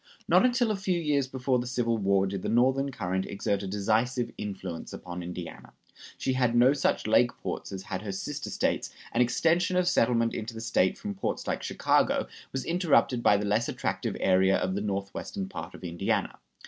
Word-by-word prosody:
Not - - +5
until 245 -2 +3
a - - 0
few 190 -2 -1
years 145 -4 +1
before 130 -1 0
the 120 - -4
Civil 120 -2 0
War 100 -1 +3
did 95 -1 -3
the - - -3
Northern 130 +4 +3
current 95 -5 -2
exert 100 0 -1
a 100 - -5
decisive 115 +5 0
influence 95 -5 -6
upon 90 0 -7
Indiana. 90 0 -8 0.4
She 130 - -1
had 125 -2 +1
no 125 +3 +6
such 145 - 0
lake 120 +3 +3
ports - - -5
as 95 -1 -6
had 95 -1 -4
her 105 -2 -4
sister 95 - -4
States, - - -1 0.2
and 120 - +2
extension 170 +9 +2
of 180 -1 +2
settlement 115 -8 +2
into 115 +1 -5
the - - -6
State 105 -5 +1
from 205 -1 -5
ports 195 - -3
like - - -2
Chicago - - +2 0.3
was 135 - -3
interrupted 165 -8 +2
by 105 - +5
the 105 - -2
less 105 +3 +1
attractive - - -2
area 95 +1 +4
of 95 - -1
the 100 - -2
northwestern 100 - -4
part 195 - -7
of - - -13
Indiana. 85 -1 -1
115 Hz, 195 wpm, -28 LUFS, 100-135 Hz, 0.4 s, no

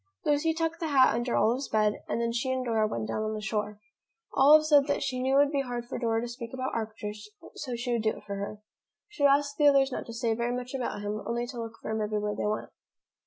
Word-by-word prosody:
Lucy 295 +2 +2
tucked 330 0 -2
the 330 - -2
hat 265 -6 +5
under 240 +1 -1
Olive's 250 +4 +2
bed 215 -1 +1
and - - -1
then 235 0 0
she 250 +3 -1
and 260 -1 -1
Dora 220 -2 +2
went 115 - -3
down 115 - -2
on 215 0 -2
the - - -4
shore. 210 -1 -3 0.5
Olive 305 +3 +7
said 290 -2 +5
that 285 - 0
she 255 -2 -2
knew 265 +1 +2
it 280 - +7
would 290 - -1
be 280 -2 +1
hard 245 -2 -4
for 240 - -5
Dora 225 -2 +1
to 240 - -3
speak 235 0 -7
about 260 0 -3
Arcturus, 210 -1 -5 0.2
so 255 -5 -5
she 240 +1 -3
would 235 - +1
do 220 0 0
it - - -13
for 200 - -5
her. 200 +1 -5 0.5
She 420 - -10
would 285 - +6
ask 285 0 +2
the 295 - +5
others 275 -1 +5
not - - -5
to 230 - -7
say 230 -1 0
very 235 +2 -1
much 250 +1 -5
about 250 -5 -3
him, 210 +1 -3
only 235 +1 -1
to 245 -1 -7
look 225 0 -7
for - - -5
him 220 0 -1
everywhere 210 0 -1
they 210 - -2
went. 215 +1 -3
240 Hz, 265 wpm, -28 LUFS, 215-275 Hz, 0.5 s, Olive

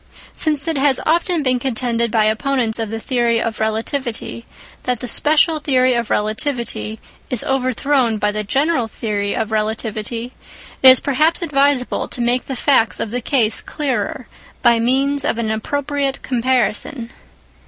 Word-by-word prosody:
Since 300 -1 0
it 320 -4 0
has 270 -2 +3
often 335 0 +1
been 255 -2 +1
contended 235 -2 -1
by 220 -1 +2
opponents 230 +1 0
of 225 -2 -2
the 225 +1 -4
theory 235 -1 +1
of 225 -1 -3
relativity 230 +2 -3 0.3
that 250 -2 -1
the 250 - -5
special 310 +5 +2
theory 255 -3 +2
of 235 -2 -1
relativity 220 0 -2 0.3
is 250 - 0
overthrown 255 -2 +1
by 210 0 0
the 210 0 -3
general 270 +3 0
theory 205 -2 -3
of 220 -1 -2
relativity, 220 +2 -3 0.5
it 265 - +9
is 255 - +7
perhaps 310 +6 +1
advisable 280 -4 +1
to - - -4
make 245 +1 +1
the 270 - -4
facts 250 -4 +2
of 210 - -3
the 245 +1 -2
case 230 -3 +2
clearer 275 -5 -3 0.4
by 235 -1 +5
means 270 +4 +1
of 235 - -1
an 225 -2 -1
appropriate 280 +4 -2
comparison. 245 0 0
250 Hz, 155 wpm, -19 LUFS, 225-275 Hz, 0.5 s, it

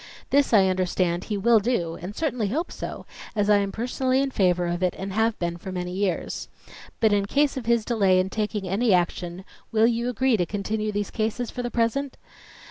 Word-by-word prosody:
This, 285 0 +3
I 205 -4 +6
understand, 185 -1 0
he 210 - -2
will 225 +3 +5
do 200 -7 -1
and 190 +4 -6
certainly 250 -9 -1
hope 310 - -2
so, - - -6 0.3
as 205 0 +2
I 205 - +6
am 200 -1 0
personally 255 +3 0
in 275 0 0
favor 180 -5 +2
of 175 +1 -2
it 180 -1 +1
and 195 0 -5
have 225 +1 +1
been 170 -1 -2
for 190 +2 -7
many 180 -1 -4
years. 185 -2 -2 0.5
But 220 -2 +4
in 200 -1 +1
case 285 +5 +2
of 250 -4 -5
his 235 -2 +2
delay 195 -6 +3
in 185 +1 -1
taking 210 -2 -2
any 200 +2 +3
action, 175 +1 -2 0.3
will 220 0 +4
you 235 +1 +1
agree 250 0 +2
to 175 - +1
continue 215 +1 -2
these 205 -1 -3
cases 225 +1 -2
for 250 - -4
the 240 - -3
present? 240 +4 -1
210 Hz, 210 wpm, -25 LUFS, 185-235 Hz, 0.5 s, I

